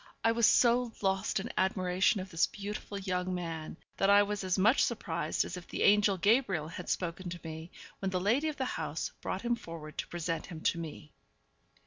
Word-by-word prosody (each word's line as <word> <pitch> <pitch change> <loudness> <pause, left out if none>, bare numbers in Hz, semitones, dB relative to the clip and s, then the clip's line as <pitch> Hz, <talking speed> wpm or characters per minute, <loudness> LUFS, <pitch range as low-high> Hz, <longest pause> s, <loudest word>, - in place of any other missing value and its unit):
I 225 - +5
was 230 -1 +4
so 240 0 +4
lost 190 0 +1
in 195 - -5
admiration 185 +2 +2
of 185 0 -7
this 165 +1 +3
beautiful 205 0 -6
young 185 -1 -2
man, 165 -3 -5 0.2
that 195 - +3
I 205 0 +7
was 205 0 -3
as 185 0 0
much 215 +8 +5
surprised 170 - -1
as 180 - -5
if 175 - -10
the - - -2
angel 205 -1 +5
Gabriel 195 - +2
had 175 +1 -7
spoken 180 +1 -2
to 175 0 -6
me, 160 +1 -7 0.3
when 195 - -1
the 185 -1 0
lady 235 +11 +2
of 305 - -3
the 265 - -1
house - - -3
brought - - -3
him 240 0 +1
forward 165 -7 -9
to - - -2
present 165 -1 -3
him 165 -4 -8
to 170 - +1
me. 155 -2 -8
190 Hz, 200 wpm, -31 LUFS, 170-210 Hz, 0.3 s, I